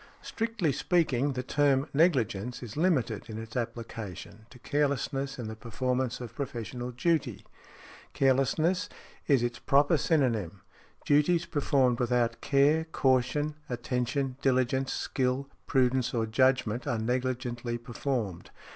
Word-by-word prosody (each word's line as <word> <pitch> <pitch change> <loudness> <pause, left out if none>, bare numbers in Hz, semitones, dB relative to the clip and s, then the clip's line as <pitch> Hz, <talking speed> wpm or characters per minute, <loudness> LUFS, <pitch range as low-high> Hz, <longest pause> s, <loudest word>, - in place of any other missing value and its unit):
Strictly 225 -8 -1
speaking, 145 -3 +1
the 125 0 -3
term 140 +1 +2
negligence 125 - +1
is 115 -2 -8
limited 140 - 0
in 110 - -6
its 110 +1 -8
application 115 -3 -6
to 125 - -14
carelessness 140 0 -1
in 120 -3 -5
the 110 - -6
performance 125 +2 -2
of 120 -2 -7
professional 125 -2 -5
duty; 155 +5 -1 0.7
carelessness 155 - +2 0.4
is 135 -5 +4
its 120 0 -2
proper 145 +4 +3
synonyme. 115 - 0 0.4
Duties 165 +4 +3
performed 140 -6 +1
without 120 -1 +1
care, 145 +3 +3
caution, 140 0 +1 0.2
attention, 125 +2 -2
diligence, 130 0 +1
skill, 130 +1 -1 0.2
prudence, 130 -1 +2
or 115 -1 +1
judgment, 125 0 +1
are 120 - 0
negligently 120 0 -2
performed. 120 -5 -3
130 Hz, 120 wpm, -29 LUFS, 120-140 Hz, 0.7 s, is